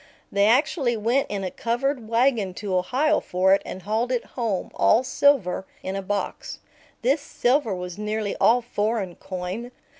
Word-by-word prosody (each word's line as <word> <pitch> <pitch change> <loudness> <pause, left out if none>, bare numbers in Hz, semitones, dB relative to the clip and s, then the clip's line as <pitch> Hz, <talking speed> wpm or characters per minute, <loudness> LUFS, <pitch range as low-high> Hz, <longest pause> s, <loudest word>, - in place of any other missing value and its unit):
They 200 +1 +3
actually 245 0 +2
went 235 +6 +1
in 200 -1 -3
a 185 - -3
covered 240 0 -2
wagon 230 -6 +2
to 200 -2 -3
Ohio 270 +12 +2
for 185 +1 +2
it 195 - +3
and 185 - -8
hauled 220 +5 -1
it 245 -2 -1
home, 225 -7 -2
all 235 - +4
silver, 245 -10 +2 0.2
in 190 - -3
a 195 - -2
box. 200 +1 -4 0.5
This 275 +5 +2
silver 245 -5 +1
was 180 +1 -6
nearly 210 -1 -2
all 245 +1 +5
foreign 215 -4 -1
coin. 185 +6 -5
220 Hz, 160 wpm, -24 LUFS, 195-245 Hz, 0.5 s, all